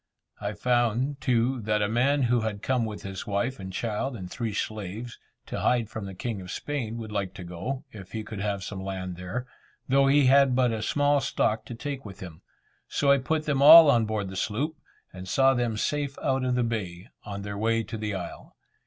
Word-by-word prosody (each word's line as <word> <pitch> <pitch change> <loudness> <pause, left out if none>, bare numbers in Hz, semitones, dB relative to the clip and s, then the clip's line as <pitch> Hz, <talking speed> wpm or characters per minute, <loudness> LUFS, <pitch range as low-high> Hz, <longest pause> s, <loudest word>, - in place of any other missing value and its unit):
I 105 0 -3
found, 125 +4 0
too, 125 0 +1
that 105 0 +1
a - - +2
man 130 +6 +2
who 120 -1 +2
had 110 -2 -3
come 125 -3 +1
with 105 -1 -6
his 95 -1 -6
wife 105 +6 -1
and 95 0 -6
child 115 +6 -2
and 90 -4 -8
three 115 -3 -3
slaves, 110 +3 -5 0.3
to - - -5
hide 120 -3 +1
from 105 -3 -5
the 95 - -8
king 110 0 -4
of 90 - -10
Spain, 120 -4 -3
would 110 -2 -7
like 100 -2 -3
to 95 - -7
go, 90 +11 -5
if 95 -4 -11
he 110 -1 -4
could 105 -1 -7
have 100 -1 -2
some 95 0 -6
land 95 -2 -4
there, 90 +8 -5 0.4
though 135 +1 +4
he 140 0 +5
had 135 0 +5
but 125 -2 +3
a 110 -1 -2
small 145 +5 +2
stock 110 -3 0
to 120 - -7
take 140 +2 -5
with 100 -2 -10
him; 85 -5 -9 0.5
so 140 -1 +2
I 140 - +5
put 155 +4 -1
them 140 -2 +1
all 155 +1 +10
on 115 -3 +3
board 105 -3 -2
the 95 - -8
sloop, 115 +11 -1 0.4
and 90 0 -8
saw 135 0 +4
them 120 -3 -1
safe 145 +3 -1
out 135 -1 +1
of 125 -1 +1
the 125 - +2
bay, 105 -4 -4
on 100 -1 -6
their 100 0 -5
way 115 +2 +1
to 115 - -7
the 105 -2 -3
isle. - - -8
115 Hz, 220 wpm, -27 LUFS, 100-130 Hz, 0.5 s, all